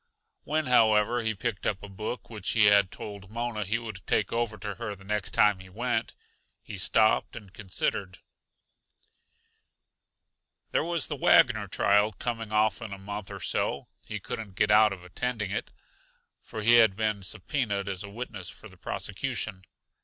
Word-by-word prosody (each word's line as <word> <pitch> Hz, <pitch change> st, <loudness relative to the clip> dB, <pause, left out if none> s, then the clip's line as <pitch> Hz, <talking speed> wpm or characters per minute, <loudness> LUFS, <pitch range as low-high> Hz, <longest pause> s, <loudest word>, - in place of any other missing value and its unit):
When, 155 Hz, +1 st, 0 dB
however, 115 Hz, -1 st, +4 dB
he 110 Hz, -1 st, -1 dB
picked 110 Hz, -1 st, -2 dB
up 100 Hz, -2 st, -1 dB
a -, -, -6 dB
book 105 Hz, +5 st, -5 dB
which 105 Hz, -4 st, -4 dB
he 110 Hz, -2 st, +5 dB
had 100 Hz, -2 st, +6 dB
told 100 Hz, -2 st, -9 dB
Mona 115 Hz, -1 st, -2 dB
he 110 Hz, +4 st, 0 dB
would 110 Hz, -5 st, -7 dB
take 105 Hz, -, +1 dB
over 115 Hz, -2 st, -1 dB
to 105 Hz, +1 st, -5 dB
her 105 Hz, -1 st, -5 dB
the 95 Hz, -, -16 dB
next 105 Hz, 0 st, -1 dB
time 105 Hz, -2 st, +4 dB
he 95 Hz, 0 st, -12 dB
went, 115 Hz, +3 st, -2 dB, 0.5 s
he 100 Hz, -, -8 dB
stopped 110 Hz, +5 st, +2 dB
and 100 Hz, -5 st, -10 dB
considered: 95 Hz, -1 st, -2 dB, 2.5 s
There -, -, +2 dB
was 170 Hz, -1 st, 0 dB
the 150 Hz, -, -3 dB
Wagner 120 Hz, -5 st, +4 dB
trial 105 Hz, +3 st, +3 dB
coming 115 Hz, +1 st, -4 dB
off 110 Hz, 0 st, +2 dB
in 110 Hz, -3 st, -6 dB
a -, -, -6 dB
month 100 Hz, +1 st, -6 dB
or 100 Hz, -2 st, -8 dB
so; -, -, -1 dB
he 105 Hz, -, -5 dB
couldn't 100 Hz, 0 st, -6 dB
get 105 Hz, +1 st, +2 dB
out 105 Hz, 0 st, +6 dB
of 95 Hz, -2 st, -7 dB
attending 105 Hz, +2 st, -3 dB
it, -, -, -3 dB, 0.7 s
for 110 Hz, -, -7 dB
he 120 Hz, +2 st, +7 dB
had 110 Hz, -4 st, +6 dB
been 110 Hz, -1 st, 0 dB
subpoenaed 100 Hz, +1 st, -2 dB
as 95 Hz, -1 st, -3 dB
a 100 Hz, -, -8 dB
witness 105 Hz, -4 st, -6 dB
for -, -, -11 dB
the 95 Hz, -3 st, -17 dB
prosecution. 100 Hz, +1 st, -4 dB
105 Hz, 170 wpm, -28 LUFS, 100-115 Hz, 2.5 s, he